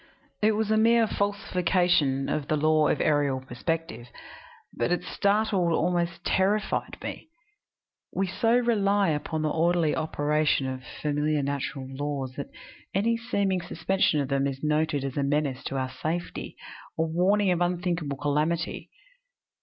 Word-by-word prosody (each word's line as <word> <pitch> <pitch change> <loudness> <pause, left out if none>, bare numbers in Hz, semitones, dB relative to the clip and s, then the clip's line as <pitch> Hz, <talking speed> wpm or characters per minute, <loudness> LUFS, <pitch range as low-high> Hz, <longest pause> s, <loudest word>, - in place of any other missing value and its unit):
It 215 +1 +4
was 215 0 0
a 220 - +4
mere 230 +1 +5
falsification 180 -9 +1
of 150 -2 -2
the 155 - +1
law 155 0 +3
of - - +1
aerial 145 -3 +2
perspective, 130 -1 -4 0.7
but 120 - -1
it 175 - 0
startled, 200 -4 +1
almost 175 0 0
terrified 205 +3 0
me. - - -6 0.8
We 195 - 0
so 225 +6 +2
rely 205 -5 +2
upon 155 +1 -2
the 155 - 0
orderly 165 -1 +2
operation 150 -2 +1
of 130 0 -4 0.2
familiar 150 0 +1
natural 140 -1 -3
laws 135 -1 -4
that 140 - -6 0.5
any 225 +4 +2
seeming 200 -5 0
suspension 190 -4 +1
of 140 -2 -2
them 140 0 +1
is 135 0 -5
noted 150 -1 +1
as 135 0 -5
a - - +2
menace 140 -2 0
to 135 - -3
our 130 -1 -2
safety, 160 +6 -4 0.4
a 160 - +2
warning 185 +5 +2
of 175 -1 0
unthinkable 175 -5 -1
calamity. 150 +4 -1
160 Hz, 145 wpm, -27 LUFS, 145-190 Hz, 0.8 s, mere